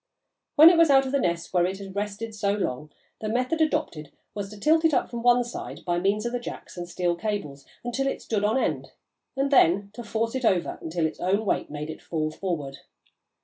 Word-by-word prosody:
When 315 +3 +10
it 340 - +3
was 330 -2 +6
out 270 -1 +5
of 260 - -3
the 280 - +2
nest 170 -6 -2
where 175 -1 +3
it 190 +1 -4
had 195 -1 -9
rested 210 +2 -4
so 200 -1 0
long, 150 -7 -3 0.3
the 215 - -3
method 255 +8 0
adopted 155 - -1 0.2
was 200 -1 -5
to 210 0 -11
tilt 315 +8 +3
it 320 -3 +4
up - - 0
from 235 -1 -4
one 245 +1 +4
side, 240 - -8
by 175 -1 0
means 200 +4 0
of 240 - -1
the 245 - -2
jacks 240 - -8
and 175 -1 -6
steel 175 -1 0
cables, 170 -8 -4 0.2
until 245 +3 -1
it - - -2
stood 210 -2 -2
on 215 +5 +2
end, - - -2 0.4
and 275 +1 0
then 200 -5 +4
to 240 - -8
force 225 +1 -2
it 260 -1 -3
over 185 -6 +1
until 165 0 -1
its 160 - -3
own 195 +4 +1
weight - - 0
made 150 +1 -5
it - - -10
fall 155 -2 -2
forward. 155 -6 -4
205 Hz, 230 wpm, -26 LUFS, 175-245 Hz, 0.4 s, When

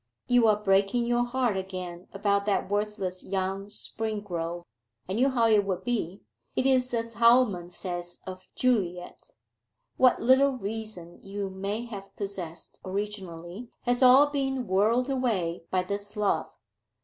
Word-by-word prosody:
'You 245 -2 +4
are 215 - +5
breaking 200 +3 +2
your 240 0 +2
heart 245 -3 0
again 185 -2 -5
about 200 0 0
that 200 - +1
worthless 205 -3 -2
young 195 +1 -2
Springrove. 205 -6 -4 0.4
I 185 - -3
knew 250 +6 +3
how 240 -3 +2
it 215 -2 +5
would 190 -2 -3
be. 205 -7 -2 0.3
It 255 - +1
is 255 -1 +3
as 230 0 -2
Hallam 230 -6 +4
says 175 -1 -6
of 185 0 -8
Juliet 180 -8 -1 0.6
what 255 -1 +5
little 265 +3 +5
reason 210 -5 -6
you 195 0 -5
may 200 +5 -3
have 200 -4 -9
possessed 190 -5 -6
originally 190 +1 -5
has 245 +1 0
all 260 +3 +8
been 270 -3 -1
whirled 220 +6 +2
away 210 -12 -1
by 185 -1 +1
this 200 +2 -5
love. 200 -6 +1
205 Hz, 140 wpm, -28 LUFS, 185-240 Hz, 0.6 s, all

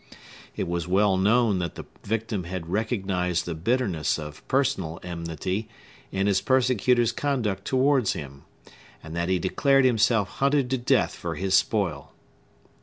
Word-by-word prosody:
It - - -2
was 85 -1 -2
well 95 +1 +3
known 105 +1 +3
that 85 -3 -3
the - - -7 0.2
victim 110 -3 -2
had 85 -1 -6
recognized 95 -5 -1
the 85 - -3
bitterness 90 -3 0
of 75 -1 -8
personal 95 - 0
enmity 85 +4 -4 0.4
in 95 0 0
his 100 -1 +2
persecutor's 125 -2 +2
conduct 120 -7 -2
towards 130 -4 +2
him, 70 -5 -8 0.6
and 80 +1 -8
that 85 +1 -1
he 95 - +2
declared 135 +9 +2
himself 115 -4 +3
hunted 140 +1 0
to 130 - +2
death 120 - +2
for - - -5
his 95 0 -2
spoil. 95 - +1
100 Hz, 145 wpm, -25 LUFS, 85-120 Hz, 0.6 s, well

